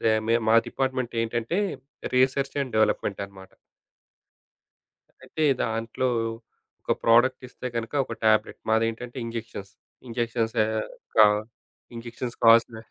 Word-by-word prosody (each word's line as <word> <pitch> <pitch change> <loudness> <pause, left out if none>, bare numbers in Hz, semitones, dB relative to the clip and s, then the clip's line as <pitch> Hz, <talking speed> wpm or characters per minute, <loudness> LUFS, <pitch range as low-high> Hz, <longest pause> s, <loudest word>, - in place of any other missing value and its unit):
They 110 - +3 0.2
may 115 - +4
మా 110 - +5
department 130 -3 -2
ఏంటంటే 120 - -2 0.6
research 135 +1 +2
and 130 - -7
development 105 -2 +1
అన్నమాట. 95 -1 -14 1.7
అయితే 155 - -3 0.2
దాంట్లో 115 +3 -1 0.7
ఒక - - 0
ప్రొడక్ట్ 120 +3 +4
ఇస్తే 125 - -8
గనక, 115 +2 -3
ఒక 115 - -6
టాబ్లెట్, 110 0 +2
మాదేంటంటే 115 +3 0
ఇంజెక్షన్స్. 110 -3 -7 0.4
ఇంజెక్షన్స్ 115 -1 -2
ఆహ్, 110 0 -2 0.3
క - - 0 0.8
ఇంజెక్షన్స్ 120 +1 -6
కావాల్సిన 115 0 +6
115 Hz, 110 wpm, -25 LUFS, 110-125 Hz, 1.7 s, కావాల్సిన